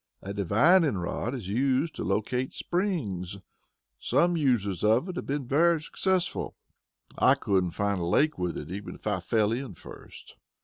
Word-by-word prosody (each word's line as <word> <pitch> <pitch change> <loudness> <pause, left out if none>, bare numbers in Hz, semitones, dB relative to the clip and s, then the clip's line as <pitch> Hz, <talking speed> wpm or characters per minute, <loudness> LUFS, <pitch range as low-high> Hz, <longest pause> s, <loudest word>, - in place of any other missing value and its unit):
"A 100 - -5
divining 125 - +3
rod 100 +8 -3
is 115 -8 -6
used 130 - +1
to - - -5
locate 125 +6 -1
springs. 110 - -2 0.6
Some 175 0 +2
users 120 - 0
of 110 - +3
it 180 - -5
have - - -5
been 140 -1 -2
very 165 +6 +3
successful. 185 +4 -1 0.6
I - - +6
couldn't 95 -2 +1
find 100 -2 0
a - - -1
lake 150 - +2
with 90 -1 -2
it, 75 +3 -7
even 100 +2 -6
if - - -18
I 105 -3 0
fell 105 +3 +1
in 120 -4 -4
first." - - -13
115 Hz, 165 wpm, -28 LUFS, 100-150 Hz, 0.6 s, I